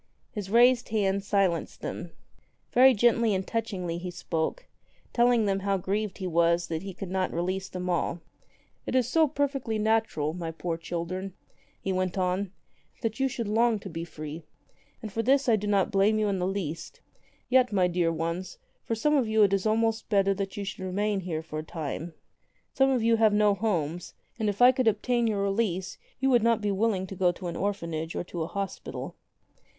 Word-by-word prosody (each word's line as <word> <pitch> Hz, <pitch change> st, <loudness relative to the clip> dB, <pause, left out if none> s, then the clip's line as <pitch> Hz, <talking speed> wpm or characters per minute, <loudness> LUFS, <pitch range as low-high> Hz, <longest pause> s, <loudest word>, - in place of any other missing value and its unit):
His 205 Hz, -4 st, -5 dB
raised 245 Hz, +3 st, +5 dB
hand 200 Hz, -3 st, +1 dB
silenced 195 Hz, -4 st, 0 dB
them. -, -, -5 dB, 0.6 s
Very 260 Hz, +1 st, +7 dB
gently 230 Hz, -1 st, +3 dB
and 190 Hz, 0 st, -2 dB
touchingly 190 Hz, -7 st, -3 dB
he 180 Hz, +1 st, -5 dB
spoke, 175 Hz, -, -3 dB, 0.5 s
telling 240 Hz, -2 st, +4 dB
them 195 Hz, -1 st, +1 dB
how 195 Hz, 0 st, 0 dB
grieved 200 Hz, +2 st, -2 dB
he 190 Hz, -, -5 dB
was 170 Hz, 0 st, +2 dB
that 160 Hz, -1 st, -2 dB
he 195 Hz, +1 st, -6 dB
could 190 Hz, -2 st, -6 dB
not 185 Hz, -1 st, 0 dB
release 185 Hz, +3 st, -2 dB
them 180 Hz, 0 st, -5 dB
all. 175 Hz, -1 st, 0 dB, 0.7 s
"It -, -, -2 dB
is 255 Hz, -3 st, +3 dB
so 315 Hz, +4 st, +4 dB
perfectly 275 Hz, -5 st, -1 dB
natural, 215 Hz, -8 st, +1 dB
my 170 Hz, -1 st, -4 dB
poor 165 Hz, +1 st, -3 dB
children," 175 Hz, +3 st, -5 dB, 0.4 s
he 190 Hz, -, -2 dB
went 185 Hz, 0 st, -1 dB
on, 185 Hz, +1 st, 0 dB, 0.5 s
"that 225 Hz, 0 st, -2 dB
you 270 Hz, -, +3 dB
should 235 Hz, -4 st, -4 dB
long 225 Hz, +2 st, +3 dB
to 195 Hz, -2 st, -9 dB
be 165 Hz, 0 st, -4 dB
free. 155 Hz, -1 st, -7 dB, 0.6 s
And 215 Hz, -3 st, -6 dB
for 225 Hz, -, 0 dB
this 270 Hz, +3 st, +3 dB
I 230 Hz, -, +5 dB
do 210 Hz, 0 st, -3 dB
not 200 Hz, -2 st, +2 dB
blame 205 Hz, +2 st, +3 dB
you 215 Hz, -1 st, +1 dB
in 195 Hz, -2 st, -1 dB
the 180 Hz, -, 0 dB
least. 170 Hz, -4 st, -4 dB, 0.5 s
Yet, 255 Hz, -1 st, +4 dB
my 190 Hz, -3 st, +3 dB
dear 175 Hz, -1 st, +1 dB
ones, 165 Hz, -, -3 dB, 0.3 s
for 225 Hz, -, -2 dB
some 300 Hz, +7 st, +2 dB
of 260 Hz, -5 st, +2 dB
you 220 Hz, 0 st, +4 dB
it 200 Hz, -1 st, +3 dB
is 195 Hz, +2 st, +1 dB
almost 225 Hz, 0 st, +1 dB
better 195 Hz, -2 st, +3 dB
that 195 Hz, 0 st, -4 dB
you 205 Hz, -, -3 dB
should 195 Hz, -1 st, -6 dB
remain 200 Hz, +2 st, 0 dB
here 165 Hz, -4 st, -4 dB
for 155 Hz, -1 st, -5 dB
a -, -, -5 dB
time. 160 Hz, +1 st, -5 dB, 0.6 s
Some 270 Hz, 0 st, +3 dB
of 255 Hz, -4 st, +1 dB
you 230 Hz, 0 st, +4 dB
have 220 Hz, -2 st, +4 dB
no 210 Hz, -1 st, +4 dB
homes, 175 Hz, -6 st, -2 dB, 0.2 s
and 215 Hz, -2 st, +1 dB
if 205 Hz, +4 st, +1 dB
I 250 Hz, -, +9 dB
could 255 Hz, -2 st, 0 dB
obtain 235 Hz, +3 st, +2 dB
your 205 Hz, -2 st, 0 dB
release 195 Hz, -2 st, -1 dB, 0.2 s
you 270 Hz, 0 st, +2 dB
would 240 Hz, -2 st, +5 dB
not 230 Hz, 0 st, +3 dB
be 210 Hz, -1 st, -1 dB
willing 195 Hz, -1 st, +1 dB
to 195 Hz, -, -8 dB
go 180 Hz, -1 st, +3 dB
to 180 Hz, -, -10 dB
an 170 Hz, -, -3 dB
orphanage 165 Hz, -5 st, -3 dB
or -, -, -2 dB
to 175 Hz, -1 st, -6 dB
a 160 Hz, -, -1 dB
hospital." 200 Hz, +1 st, -5 dB
195 Hz, 200 wpm, -28 LUFS, 180-225 Hz, 0.7 s, I